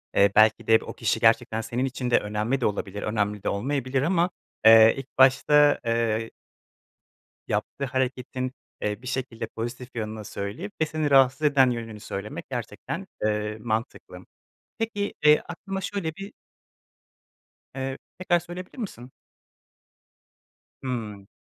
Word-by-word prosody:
Eee, 100 0 +5
belki 110 0 +5
de 110 0 +5
b - - -10
o - - -6
kişi - - 0
gerçekten 110 - +3
senin 120 +3 -2
için 125 -1 -3
de - - +5
önemli 105 +6 -2
de - - +1
olabilir, 105 -1 -2
önemli 105 -1 -1
de - - 0
olmayabilir 130 +4 -1
ama, 170 +3 +2 0.4
eee, 110 0 +9
ilk 135 -1 -9
başta, 145 +3 +5
eee 115 -1 0 1.2
yaptığı 140 - -2
hareketin, 130 -1 -2 0.3
eee, 105 +1 -2
bir 125 - -9
şekilde 125 -3 -3
pozitif 120 +3 -6
yanını 110 -1 -4
söyleyip 110 - -5
ve - - +4
seni 155 -1 -2
rahatsız 135 0 +5
eden 140 -4 +5
yönünü 115 -3 -5
söylemek 100 0 -6
gerçekten, - - -5 0.2
eee, 105 0 -1
mantıklı. 110 0 -3 0.6
Peki, 210 -3 -2
eee, 150 0 +7
aklıma 195 +3 -5
şöyle 190 -5 -3
bir 195 +3 -8 1.4
Eee, 135 0 -3 0.2
tekrar 175 -1 +2
söyleyebilir 175 +4 -9
misin? 130 - -7 1.7
Hımm. 110 -6 -5
125 Hz, 135 wpm, -26 LUFS, 110-145 Hz, 1.7 s, eee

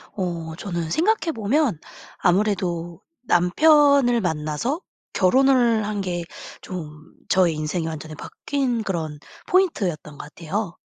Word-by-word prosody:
어 170 -4 -3
저는 170 -4 -4
생각해보면 300 - +1 0.4
아무래도 175 -3 0 0.3
남편을 280 - +4
만나서 160 - -2 0.3
결혼을 240 +1 +3
한 210 -1 -2
게 175 -2 -3 0.4
좀 155 -3 -9 0.2
저의 180 -3 +3
인생이 155 +2 -2
완전히 155 -1 -6
바뀐 250 - -2
그런 160 -6 -3 0.3
포인트였던 190 - 0
것 145 - -10
같아요. 175 +2 -4
185 Hz, 250 characters per minute, -23 LUFS, 165-245 Hz, 0.4 s, 남편을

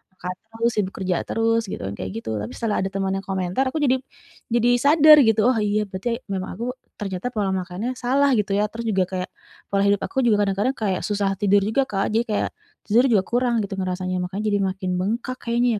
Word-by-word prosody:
makan 180 0 -5 0.2
terus, 230 +1 0
sibuk 195 -2 -1
kerja 185 -2 -1
terus 225 0 +2
gitu - - -5
kan, 95 - -4
kayak 95 - -4
gitu. 115 - -6
Tapi 105 - -6
setelah 225 -3 -1
ada 190 - -1
temen 195 -1 -1
yang 195 - -7
komentar, 190 +5 0
aku 285 - -4
jadi, 260 -1 +4 0.6
jadi 240 +1 +3 0.2
sadar 305 +1 +8
gitu. 225 0 +3
Oh, 245 - 0
iya, 210 0 +1
berarti, 195 +4 -4 0.2
memang 190 -1 -3
aku, 235 - -3 0.3
ternyata 195 +1 -4
pola 205 -3 0
makannya 190 +7 -3
salah 275 +3 +2
gitu 205 -1 -1
ya. 210 - +2
Terus 230 +1 -6
juga 190 -3 +2
kayak, 185 -1 -3 0.4
pola 200 0 +1
hidup 200 0 +2
aku 265 -2 -1
juga 210 -3 +4
kadang-kadang 200 +7 0
kayak 190 -4 0
susah 205 -1 0
tidur 205 0 +3
juga 220 +7 +1
Kak. 195 -6 -1
Jadi 230 - +3
kayak, 210 - 0 0.4
tidur 230 +4 +4
juga 200 -4 +4
kurang 240 -1 +1
gitu 195 -1 -5
ngerasanya, 185 0 -2
makanya 195 +4 -4
jadi 205 -1 +1
makin 190 0 -3
bengkak 230 +7 -2
kayaknya 235 -1 +1
205 Hz, 215 wpm, -23 LUFS, 190-235 Hz, 0.6 s, sadar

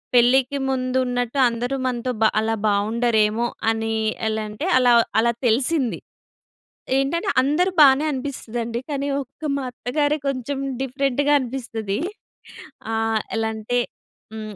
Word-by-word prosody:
పెళ్ళికి 260 +3 +4
ముందున్నట్టు 255 0 -1
అందరూ 245 +3 -3
మనతో 250 0 -2
బ - - +5 0.2
అలా 225 0 0
బావుండరేమో 220 +2 +2 0.2
అని, 225 0 -2 0.3
ఎలా 220 0 -1
అంటే 215 +11 -5
అలా 245 -1 +5 0.3
అలా 235 +1 +3 0.2
తెలిసింది. 255 +2 +1 1.0
ఏంటంటే 335 +9 -1
అందరూ 345 +7 +2
బానే 275 +1 +7
అనిపిస్తదండి. 240 -4 -4
కానీ 280 0 -2 0.2
ఒక్క 275 +4 -22
మా 275 - -3
అత్తగారే 290 +5 0
కొంచెం 270 +1 -3 0.2
డిఫరెంట్‌గా 275 +2 0
అనిపిస్తది. 230 -5 -4 0.9
ఆహ్, 225 -1 +1 0.2
ఎలా 225 0 0
అంటే 230 +3 -1 0.5
హ్మ్. 215 -1 -7
245 Hz, 115 wpm, -22 LUFS, 225-275 Hz, 1.0 s, బానే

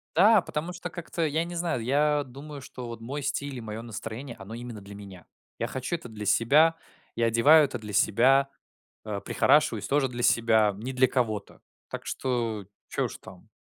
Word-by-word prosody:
Да, 210 +4 +6
потому 165 +2 -4
что, 180 - -6
как-то 165 0 -3
я 155 +2 0
не 175 - -7
знаю, 170 -8 -1
я 145 +3 +2
думаю, 140 +3 -9
что 125 -2 -8
вот 115 -1 -7
мой 140 +5 -5
стиль 140 0 -2
и 125 - -6
мое 110 0 -6
настроение, 115 +2 -7
оно 100 +3 -9
именно 120 -3 -7
для 100 +1 -11
меня. 100 -4 -11 0.3
Я - - -2
хочу 130 +6 -3
это 125 -8 -8
для 105 -1 -7
себя. 145 +11 +4 0.4
Я 115 0 +2
одеваю 145 +8 +6
это 135 - -5
для 105 -2 -8
себя. 130 +7 +4 0.6
Э, 105 -2 -3
прихорашиваюсь - - +2
тоже 140 -1 +2
для 120 -1 -5
себя. 115 -3 +4
Не 125 +5 -5
для 130 0 +4
кого-то. 110 -6 -2 0.3
Так - - -6
что 115 -6 -2 0.2
чё - - -1
уж - - -6
там? - - -15
125 Hz, 190 wpm, -27 LUFS, 110-145 Hz, 0.6 s, Да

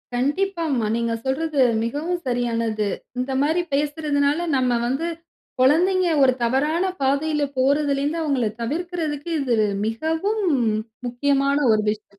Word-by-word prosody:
கண்டிப்பாம்மா. 295 - 0
நீங்க 235 0 -1
சொல்றது 290 +2 -1 0.2
மிகவும் 300 +9 -2
சரியானது. 230 -3 -1 0.3
இந்த 255 +2 -2
மாரி 315 +5 +2
பேசுறதனால, 295 +2 0
நம்ம 250 -2 +1
வந்து 270 +7 -1 0.5
கொழந்தைங்க 355 +8 +4 0.2
ஒரு 255 - +5
தவறான 295 +8 +1 0.2
பாதையில 290 +3 +1
போறதிலிந்து 280 +3 +1
அவுங்கள 280 -6 0 0.2
தவிர்க்கிறதற்கு 315 +2 -3
இது 250 -4 +1 0.3
மிகவும் 320 - -1 0.7
முக்கியமான 275 +3 +1
ஒரு 215 -1 +3
விஷயம். 210 -1 -6
285 Hz, 110 wpm, -22 LUFS, 250-320 Hz, 0.7 s, ஒரு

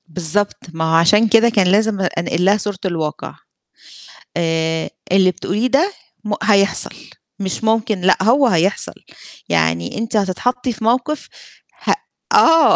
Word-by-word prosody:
بالضبط، 175 +5 -1 0.2
ما 160 0 -2
هو - - +3
عشان 210 +7 +4
كده 225 +2 +4
كان 200 -5 +2
لازم 205 +2 +2
أ - - +1
أنقل 170 0 -1
لها 200 +2 +4
صورة 205 -1 -4
الواقع. 160 -4 -4 1.0
آآ، 160 -1 -1 0.2
اللي 185 -1 +4
بتقوليه 210 +6 -2
ده 310 +10 +1 0.3
م 210 -1 -3
هيحصل 200 -2 +2 0.4
مش 195 +2 -4
ممكن 220 -3 0
لأ، 185 +1 +3
هو 255 +6 +4
هيحصل، 185 -1 0 0.6
يعني 85 0 0
أنتِ 225 +1 -3
هتتحطّي 245 +6 -1
في 220 - -9
موقِف 255 +6 0 0.6
هأ - - +2 0.4
آه، 325 -7 +5
200 Hz, 140 wpm, -18 LUFS, 170-225 Hz, 1.0 s, آه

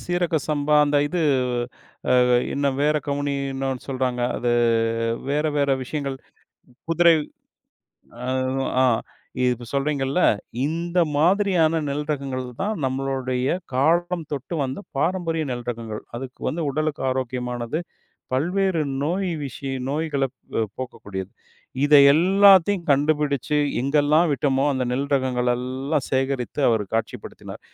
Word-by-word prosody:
சீரக 175 -2 0
சம்பா, 150 0 +1
அந்த 145 0 +1
இது 180 +2 -2 1.0
அ, - - +4 0.3
என்ன 140 0 0 0.2
வேற 150 +1 +3
கவுனி 145 0 -1 0.2
இன்னோனு 135 -1 -3
சொல்றாங்க, 130 -2 -1 0.2
அது 120 0 0 0.8
வேற 150 +2 +1
வேற 140 -1 +2
விஷயங்கள், 140 0 -4 0.7
குதிரை 170 0 +5 1.1
அ, - - -3 0.6
ஆ, - - +5 0.6
இப்ப 125 -1 0
சொல்றீங்கல்ல, 140 +2 0 0.5
இந்த 170 +3 -2 0.2
மாதிரியான 170 -1 +3
நெல் 145 +1 -3
ரகங்கள் 135 -3 -3 0.2
தான் 215 +2 -1
நம்மளுடைய 130 +1 -1 0.2
காலம் 170 +4 +1
தொட்டு 145 +4 -4
வந்த 130 +7 -4 0.2
பாரம்பரிய 165 0 0
நெல் 120 -1 -6
ரகங்கள். 115 -2 -6
அதுக்கு 130 +1 -8
வந்து 165 +1 -2
உடலுக்கு 155 +1 -2
ஆரோக்கியமானது. 125 +1 -3 0.5
பல்வேறு 180 +5 +1 0.2
நோய் 185 +5 -1 0.2
விஷய 135 0 -5 0.2
நோய்களை 145 -2 0 0.5
போக்கக்கூடியது. 95 -7 -6 0.5
இதை 145 0 +7 0.2
எல்லாத்தையும் 190 +1 +5
கண்டுபிடிச்சு, 145 0 +1 0.2
எங்கெல்லாம் 150 +5 +3
விட்டோமோ 135 -1 +1
அந்த 130 -1 -1
நெல் 135 +3 -1
ரகங்கள் 125 -2 0
எல்லாம் 130 +3 -2
சேகரித்து, 135 0 -1
அவரு 110 -3 +1
காட்சிப்படுத்தினார். 115 0 -5
140 Hz, 110 wpm, -23 LUFS, 130-160 Hz, 1.1 s, இதை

